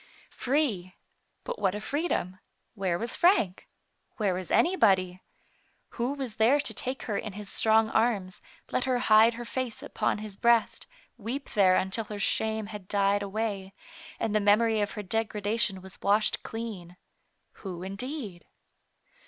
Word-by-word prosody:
Free! 245 - -1 0.5
but - - -5
what 190 - +1
a - - -3
freedom! 215 - -2 0.3
Where 190 -5 -1
was 230 +6 -3
Frank? 285 - +2 0.5
Where 205 -4 +1
was 180 -1 -5
anybody? 190 - +3 0.7
Who 245 +3 -2
was 265 -6 -5
there 240 +7 +4
to - - 0
take 260 +1 -3
her 210 -3 -2
in 215 - -6
his 205 0 -7
strong 220 0 +3
arms, 210 -5 0 0.3
let 250 - 0
her 255 -1 +1
hide 225 -1 +5
her 240 +1 -6
face 255 -2 -4
upon - - -1
his 210 -2 -8
breast, 235 0 +2 0.3
weep 245 +6 -5
there 190 -4 +4
until 190 +5 -1
her 210 0 -6
shame 220 +2 0
had 205 -3 -9
died 200 0 +2
away, 200 -1 -3 0.4
and 220 - -1
the 215 - +3
memory 215 +2 +3
of 205 - -2
her 210 - -5
degradation 210 -1 -1
was 190 0 -12
washed 210 +2 +2
clean. 205 -6 -7 0.6
Who, 180 -3 -6
indeed 200 - -6
215 Hz, 150 wpm, -28 LUFS, 195-235 Hz, 0.7 s, hide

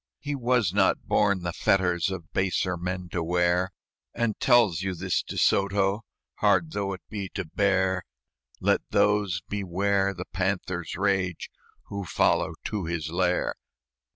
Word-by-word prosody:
"He 145 0 -4
was 125 -8 +1
not 100 -1 +2
born 100 -3 +2
the 85 -1 -2
fetters 90 -2 +2
Of 85 -4 -7
baser 95 -1 0
men 90 +1 -4
to 85 - -2
wear, 90 +2 +2 0.5
And 115 -2 +1
tells 115 -10 +4
you 95 -1 -2
this, 90 +2 0
De - - -7
Soto, 100 +1 +2 0.4
Hard 160 - +3
though 100 -7 -2
it 95 - -9
be 100 -3 -5
to 95 -2 -2
bear 95 +1 +1 0.6
Let - - +2
those 100 -3 +2
beware 100 0 0
the 90 +1 -6
panther's 90 -2 -2
rage 95 -2 0 0.4
Who 100 0 -4
follow - - +1
to 105 -5 -3
his 80 -2 -3
lair. 90 +1 +1
95 Hz, 145 wpm, -26 LUFS, 90-100 Hz, 0.6 s, tells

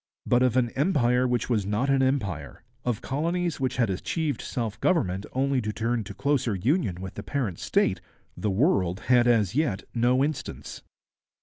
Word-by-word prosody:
But 125 - +3
of 130 -1 +3
an 120 -2 +2
empire 130 -5 +2
which 125 -1 0
was 115 -5 +1
not 105 +8 0
an 135 -1 +3
empire, 100 - -2 0.2
of 120 -4 -2
colonies 170 +4 -1
which 130 -1 -1
had 115 -5 +2
achieved 150 - -2
self 115 -4 -4
government 100 - +1
only 135 0 +1
to 105 -1 -2
turn 115 +1 -1
to - - -8
closer 135 -6 0
union 105 - 0
with 95 -1 -6
the - - -6
parent 120 -11 -3
state, - - +1 0.3
the 105 - -2
world 95 - +1
had 125 -1 +5
as 110 -5 +3
yet 125 -9 0
no 125 +3 +3
instance. 150 -1 -4
125 Hz, 175 wpm, -26 LUFS, 105-140 Hz, 0.3 s, had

